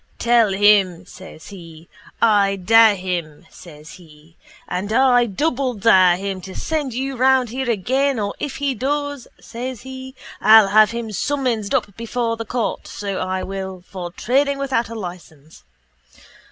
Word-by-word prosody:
Tell 235 -3 +3
him, 195 -3 +3
says 185 -4 -13
he, 165 -4 -13 0.4
I 205 -3 +3
dare 220 +3 +5
him, 175 -4 -5
says 155 -3 -13
he, 155 0 -19 0.3
and 195 +4 -4
I 245 0 +4
doubledare 225 - +2
him 195 0 -5
to 190 0 -10
send 295 -6 -3
you 270 +1 -3
round 260 -1 +2
here 260 +2 -4
again 260 +6 0
or 200 -1 -2
if 285 - -4
he 280 -1 -1
does, 285 +1 -3
says 245 +1 -7
he, 260 0 -9 0.3
_I'll 215 -1 +7
have 215 0 +6
him 230 -1 -5
summonsed 235 -2 -2
up 200 - -2
before 230 0 -2
the 230 0 -6
court, 235 +1 -3
so 200 -2 -5
I 185 0 -3
will, 190 -2 -6
for 180 -2 -7
trading 275 +8 0
without 265 -4 -1
a 230 - -7
licence. 175 -6 -10
215 Hz, 150 wpm, -20 LUFS, 185-255 Hz, 0.4 s, I'll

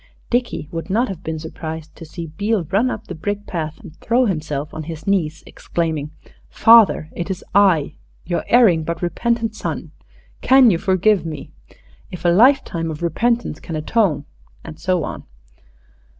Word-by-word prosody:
Dickie 240 -10 -1
would 165 +3 -5
not 235 +6 +1
have 185 -3 -6
been 160 0 -3
surprised 160 0 -7
to 165 - -10
see 165 +2 -7
Beale 210 0 0
run 220 +6 +2
up 220 -3 -5
the - - -7
brick 205 +5 -4
path 160 -3 -4
and 175 -7 -12
throw 245 +2 +2
himself 150 -6 -3
on 155 -1 -6
his 160 -1 -8
knees, 170 -5 0
exclaiming, 160 -3 -3 0.4
"Father, 225 -8 +5
it 175 +2 -4
is 190 - -4
I 180 -8 +4 0.3
your 175 0 -2
erring 210 -10 +5
but 170 +2 -4
repentant 225 +6 -1
son! - - -5 0.5
Can 260 -3 +6
you 170 - 0
forgive 190 0 +2
me? 155 -3 -7 0.6
If 180 -1 -9
a - - +5
lifetime 190 -5 +3
of 155 +1 -6
repentance 230 +3 0
can 165 - -6
atone 155 -2 0 0.2
..." - - -31
and 155 -1 -9
so 180 -2 0
on. - - -6
175 Hz, 165 wpm, -20 LUFS, 160-215 Hz, 0.6 s, Can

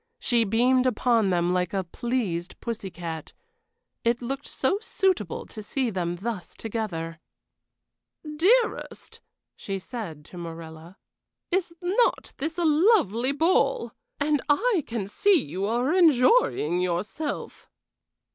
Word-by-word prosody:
She 235 -2 +2
beamed 250 +5 +3
upon 235 -4 +2
them 175 -1 +1
like 180 +1 0
a 190 - 0
pleased 190 -4 -3
pussy 220 -4 -4
cat. 165 -3 -7 0.7
It 235 +1 +2
looked 270 +3 -4
so 375 +10 0
suitable 375 - 0
to 215 - -8
see 245 +3 -1
them 175 -3 -2
thus 200 0 -5
together! 175 -8 -4 1.2
"Dearest," 440 +9 +1 0.4
she 195 -1 -4
said 185 - -7
to 180 - -10
Morella, 165 +1 -9 0.5
"is 350 -2 0
not 395 +7 +1
this 315 +4 -3
a 345 - +1
lovely 300 - +3
ball? 345 - +2 0.3
And 295 0 +1
I 375 +3 +3
can 225 -4 -3
see 365 - +3
you 185 +7 -3
are 245 +7 +1
enjoying 300 - +4
yourself." 185 - -3
235 Hz, 120 wpm, -26 LUFS, 180-305 Hz, 1.2 s, enjoying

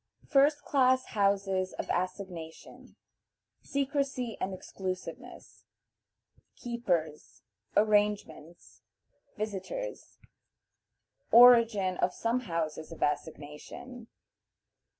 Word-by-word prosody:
First 290 +1 +3
Class 260 -2 +3
Houses 195 -2 +1
of - - -5
Assignation. 180 -3 -6 0.7
Secrecy 275 -4 -2
and 195 - -1
Exclusiveness. 185 0 -7 0.9
Keepers. 175 -11 -3 0.3
Arrangements. 205 -6 0 0.6
Visitors. 215 - -5 1.1
Origin 230 -6 +6
of 180 - 0
some 230 +2 0
Houses 165 -8 -4
of 165 - -4
Assignation. 155 - -5
200 Hz, 70 wpm, -30 LUFS, 180-245 Hz, 1.1 s, Origin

